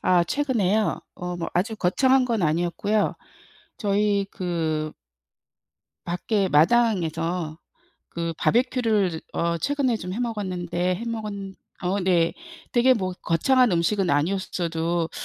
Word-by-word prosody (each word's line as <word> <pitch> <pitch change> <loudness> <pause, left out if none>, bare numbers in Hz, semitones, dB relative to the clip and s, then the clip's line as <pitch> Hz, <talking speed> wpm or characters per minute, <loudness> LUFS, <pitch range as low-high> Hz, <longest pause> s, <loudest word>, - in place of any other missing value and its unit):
아 180 -2 +4
최근에요? 220 - +1
어 180 0 -5
뭐 170 - -3
아주 210 +5 0
거창한 260 +8 +3
건 235 -4 0
아니었고요. 175 +6 +1 0.6
저희 200 -1 +1
그 160 -4 -2 1.1
밖에 195 +3 0
마당에서 165 -3 +2 0.5
그 170 0 -3
바비큐를 230 -5 +2
즈 160 -1 -6
어 170 0 0
최근에 280 - 0
좀 180 -3 -6
해 - - -4
먹었는데 185 -6 -2
해 225 - -6
먹었 225 -2 -3 0.5
어 185 +3 0
네. 175 -3 +2 0.4
되게 255 +1 +5
뭐 185 -5 -2
거창한 250 +9 +3
음식은 180 +3 +1
아니었어도 170 +1 0
185 Hz, 245 characters per minute, -24 LUFS, 170-220 Hz, 1.1 s, 되게